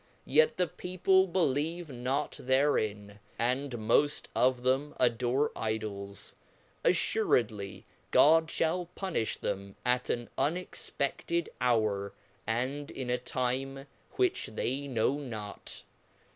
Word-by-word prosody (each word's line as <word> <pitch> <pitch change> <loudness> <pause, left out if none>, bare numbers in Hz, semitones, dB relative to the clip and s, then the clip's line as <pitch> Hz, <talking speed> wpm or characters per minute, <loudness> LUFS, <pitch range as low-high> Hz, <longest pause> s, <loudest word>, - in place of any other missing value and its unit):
yet 470 0 +4
the 180 - +3
people 185 +2 +2
believe 165 -1 0
not 130 +4 -1
therein, 110 -7 +1 0.2
and 130 +3 0
moft 120 +6 +2
of 125 -1 +3
them 135 +3 +1
adore 125 +3 +2
Idols; 105 -3 -4 0.5
afTuredly 115 - +1 0.3
Godfliallpunifluhem 160 - +1
at 125 0 +1
an 120 -1 -1
unexpeded 170 0 -1
hour, 110 -5 +1 0.3
and 130 +6 -1
in 130 -2 -4
a 125 - +1
time 130 +2 -2 0.3
which 375 -2 +1
they 135 +5 -1
know 130 +2 +1
not. 110 -7 -7
130 Hz, 95 wpm, -30 LUFS, 115-150 Hz, 0.5 s, yet